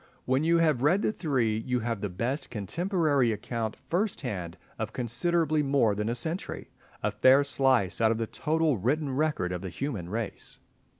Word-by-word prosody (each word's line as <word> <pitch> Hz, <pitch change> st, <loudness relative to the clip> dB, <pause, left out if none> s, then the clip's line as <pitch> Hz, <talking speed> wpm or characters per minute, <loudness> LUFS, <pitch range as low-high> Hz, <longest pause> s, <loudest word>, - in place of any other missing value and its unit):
When 130 Hz, +3 st, +1 dB
you 170 Hz, +1 st, +4 dB
have 155 Hz, -7 st, +2 dB
read 175 Hz, +9 st, +3 dB
the -, -, +2 dB
three 125 Hz, -, 0 dB
you 125 Hz, +2 st, -1 dB
have 115 Hz, -3 st, -2 dB
the 105 Hz, -, -2 dB
best 120 Hz, -, -3 dB
contemporary 145 Hz, -, +1 dB
account 110 Hz, +1 st, -3 dB
first 180 Hz, +10 st, -2 dB
hand 90 Hz, -, -4 dB, 0.2 s
of 110 Hz, -1 st, -3 dB
considerably 155 Hz, +6 st, +1 dB
more 135 Hz, -6 st, +2 dB
than 105 Hz, +2 st, -2 dB
a 120 Hz, -, 0 dB
century—a 160 Hz, +9 st, -4 dB
fair 135 Hz, +2 st, +5 dB
slice 130 Hz, -8 st, +1 dB
out 110 Hz, -, +5 dB
of 115 Hz, -, +1 dB
the 115 Hz, -, -1 dB
total 155 Hz, +2 st, 0 dB
written 135 Hz, +5 st, 0 dB
record 150 Hz, -11 st, 0 dB
of 90 Hz, -1 st, -3 dB
the 95 Hz, -, -5 dB
human 105 Hz, -, -4 dB
race. 110 Hz, +1 st, -5 dB
130 Hz, 175 wpm, -28 LUFS, 110-155 Hz, 0.2 s, fair